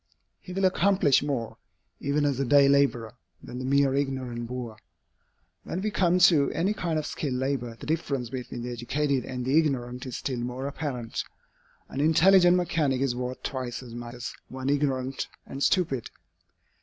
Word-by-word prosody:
He 185 - -11
will 190 +1 0
accomplish 185 -6 +3
more, 135 -6 -3 0.4
even 145 +1 0
as 140 -3 0
a - - +2
day 140 +2 +6
laborer, 140 -5 +2 0.3
than 125 - -7
the 130 - -4
mere 140 0 +3
ignorant 130 -4 -2
boor. 120 -3 -6 0.9
When 175 - -4
we 215 - 0
come 180 -3 +3
to 165 -6 +5
any 180 +6 +1
kind 170 -6 -2
of 155 - -2
skilled 140 -4 -3
labor, 130 -3 -2
the - - -8
difference 140 -7 -2
between 125 -2 -5
the 125 - -4
educated 130 +3 -1
and 125 -1 -4
the 135 +3 +1
ignorant 125 -4 -2
is 125 - -4
still 130 -3 -3
more 125 +2 -4
apparent. 135 -5 -4 0.6
An 135 - -3
intelligent 175 +3 +6
mechanic 155 -7 +1
is 135 -2 0
worth 125 +1 -4
twice 130 -2 -4
as 120 -2 -10
much 120 0 -7
as 120 0 -6
one 130 +1 -4
ignorant 135 -2 -1 0.2
and 135 - -7
stupid. 140 - +1
135 Hz, 170 wpm, -27 LUFS, 125-150 Hz, 0.9 s, day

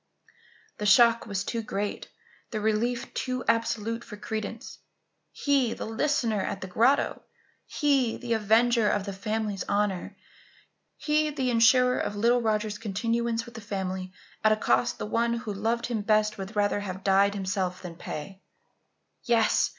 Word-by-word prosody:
The 210 - -1
shock 230 +2 +5
was 200 -2 -2
too 230 +2 -3
great, 205 -1 -4 0.4
the 215 - -3
relief 220 +3 -1
too 255 -1 -2
absolute 230 0 0
for 210 -3 -10
credence. 220 +1 -6 0.5
He, 275 -5 +1
the - - -5
listener 225 -2 0
at 190 - -4
the - - -4
grotto? 235 +9 +2 0.5
He, 275 -6 +1
the 240 -2 -2
avenger 225 +1 +3
of 200 -1 0
the 200 - -4
family's 210 0 -2
honour? 200 -3 -1 0.8
He, 305 0 +1
the 265 -4 -1
insurer 250 +2 +4
of 205 - -2
little 235 +4 +3
Roger's 215 -1 -1
continuance 230 +2 -1
with 235 - -12
the 225 - -8
family 190 -2 -4 0.3
at 215 - +5
a - - +5
cost 125 - +1
the - - -4
one 235 +2 0
who 230 -3 -4
loved 225 +4 -1
him 235 -3 -2
best 215 0 +2
would 195 +3 -7
rather 205 0 +1
have 190 -2 -6
died 200 +1 +3
himself 190 -2 -2
than 175 -2 -6
pay? 175 +3 -7 0.8
Yes! 230 -3 +3
220 Hz, 155 wpm, -27 LUFS, 200-235 Hz, 0.8 s, shock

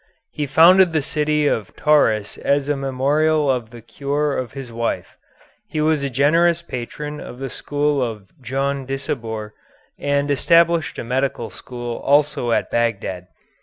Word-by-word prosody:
He 150 -1 -3
founded 170 +5 +6
the 155 - +2
city 150 0 0
of 110 -8 -1
Tauris 110 -9 +2
as 140 0 +1
a 145 - +1
memorial 140 +3 +1
of 120 -4 -2
the 120 -1 -12
cure 140 +5 -2
of 125 -4 -4
his 130 -4 -8
wife. 115 0 -3 0.5
He 165 -7 -4
was 155 -1 +2
a 140 - -1
generous 165 +6 +3
patron 150 +2 -6
of 125 - -9
the 135 -1 -5
school 145 -1 -1
of 110 -5 -3 0.2
Djondisabour 135 -4 -3 0.5
and 145 0 0
established 165 +3 +3
a - - -4
medical 125 -2 -2
school 120 +3 -6
also 145 -4 +2
at - - 0
Bagdad. 100 -6 -1
140 Hz, 145 wpm, -21 LUFS, 120-150 Hz, 0.5 s, founded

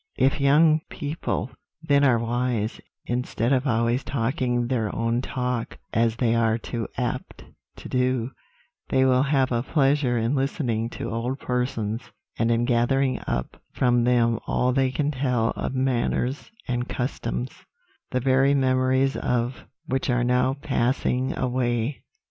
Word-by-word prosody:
If 135 +3 +2
young 155 +3 +5
people, 145 -5 -3 0.3
then, 145 -2 +3
are 130 -4 +5
wise, 115 -1 -1 0.2
instead 120 0 -1
of 135 +2 +1
always 115 +1 +1
talking 125 -1 -1
their 120 -4 0
own 115 +1 0
talk, 125 -2 -3 0.2
as 115 0 +2
they 115 -1 +1
are 115 -1 +2
too 115 0 -4
apt 125 +1 -3 0.3
to - - -10
do, 125 -1 0 0.6
they 130 0 +3
will 130 -1 +4
have 135 -2 +2
a 120 -1 +1
pleasure 135 -2 +2
in 115 +3 0
listening 130 -5 -1
to - - -5
old 120 +4 -2
persons, 125 -4 -2 0.4
and 115 - +2
in 115 0 +2
gathering 130 +2 +1
up - - -3
from 120 -2 +2
them 115 -2 +3
all 125 0 +1
they 135 0 +2
can 145 +3 -1
tell 125 -5 0
of 130 - -4
manners 130 +1 0 0.2
and 120 0 -2
customs, 65 - -3 0.6
the 125 - 0
very 135 +2 +3
memories 130 0 +2
of 125 +1 -1 0.2
which 135 -3 -1
are 120 -1 +2
now 125 +2 +2
passing 130 -1 0
away. 125 0 -1
125 Hz, 145 wpm, -25 LUFS, 120-135 Hz, 0.6 s, young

